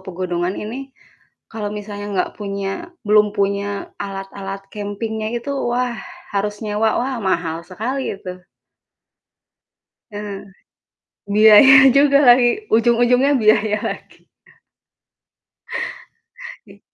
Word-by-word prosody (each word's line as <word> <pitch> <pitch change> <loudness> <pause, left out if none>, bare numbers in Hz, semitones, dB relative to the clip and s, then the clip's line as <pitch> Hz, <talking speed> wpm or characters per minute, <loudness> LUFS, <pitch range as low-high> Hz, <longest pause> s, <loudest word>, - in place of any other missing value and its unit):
pegunungan 180 0 -3
ini, 255 +6 -6 0.6
kalau 210 -2 -4
misalnya 205 -1 -7
nggak 180 - -1
punya 200 - -4 0.2
belum 210 -1 +4
punya 200 0 -2
alat-alat 195 0 -6
camping-nya 215 +1 -4
itu, 280 +4 -4 0.2
wah 245 0 -1 0.4
harus 205 +1 -2
nyewa, 215 +1 0
wah 260 +1 -2
mahal 170 -4 -1
sekali 245 +9 -4
itu. 180 -1 -10 1.7
Eee, 205 -1 -7 0.9
biaya 220 +5 +8 0.2
juga 280 0 +5
lagi, 245 0 +6 0.3
ujung-ujungnya 240 +4 +3
biaya 215 0 +3
lagi. - - -10 2.4
Iy - - -17
210 Hz, 90 wpm, -19 LUFS, 195-235 Hz, 2.4 s, biaya